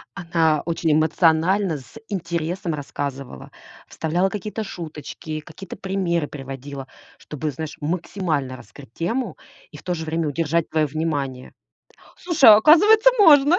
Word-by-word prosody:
Она 165 Hz, -5 st, +1 dB
очень 165 Hz, -1 st, 0 dB
эмоционально, 165 Hz, +3 st, +2 dB
с 140 Hz, -, -14 dB
интересом 170 Hz, -2 st, -3 dB
рассказывала, 140 Hz, -, -6 dB, 0.4 s
вставляла 175 Hz, +4 st, -1 dB
какие-то 210 Hz, +2 st, -5 dB
шуточки, 155 Hz, -3 st, -7 dB
какие-то 170 Hz, +4 st, -10 dB
примеры 180 Hz, -5 st, -1 dB
приводила, 135 Hz, -1 st, -8 dB, 0.3 s
чтобы, 150 Hz, +1 st, -5 dB
знаешь, 150 Hz, +2 st, -7 dB
максимально 155 Hz, -4 st, -2 dB
раскрыть 130 Hz, -1 st, -15 dB
тему 205 Hz, +2 st, -3 dB, 0.3 s
и 150 Hz, -, -11 dB
в -, -, -15 dB
то 180 Hz, -, -2 dB
же 160 Hz, -1 st, -5 dB
время 160 Hz, 0 st, -1 dB
удержать 165 Hz, +2 st, -1 dB
твоё 155 Hz, -1 st, +1 dB
внимание. 140 Hz, -4 st, -3 dB, 0.4 s
О, -, -, -22 dB
слушай, 325 Hz, -9 st, +5 dB
а 210 Hz, -, +11 dB
оказывается, 420 Hz, -, +6 dB
можно! 305 Hz, -3 st, +7 dB
165 Hz, 135 wpm, -22 LUFS, 150-190 Hz, 0.4 s, а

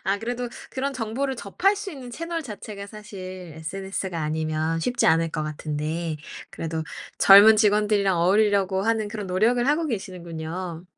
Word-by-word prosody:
아 195 Hz, +1 st, +1 dB
그래도 245 Hz, +2 st, -3 dB, 0.2 s
그런 275 Hz, +1 st, -2 dB
정보를 255 Hz, +3 st, -2 dB
접할 375 Hz, -, +1 dB
수 400 Hz, -1 st, -5 dB
있는 255 Hz, -4 st, -9 dB
채널 335 Hz, +4 st, -4 dB
자체가 210 Hz, -4 st, -8 dB
사실 185 Hz, -5 st, -9 dB
SNS가 190 Hz, +1 st, -4 dB
아니면 155 Hz, +1 st, -1 dB
쉽지 245 Hz, +7 st, +1 dB
않을 165 Hz, 0 st, +3 dB
것 155 Hz, -, -2 dB
같은데 155 Hz, +2 st, -3 dB, 0.3 s
그래도 160 Hz, -1 st, -4 dB, 0.4 s
젊은 205 Hz, +3 st, +9 dB
직원들이랑 205 Hz, -3 st, +3 dB
어울리려고 195 Hz, +1 st, +3 dB
하는 220 Hz, -1 st, 0 dB
그런 210 Hz, -1 st, -5 dB
노력을 225 Hz, +7 st, +2 dB
하고 310 Hz, +3 st, +2 dB
계시는군요. 175 Hz, -, -5 dB
200 Hz, 355 characters per minute, -25 LUFS, 165-225 Hz, 0.4 s, 젊은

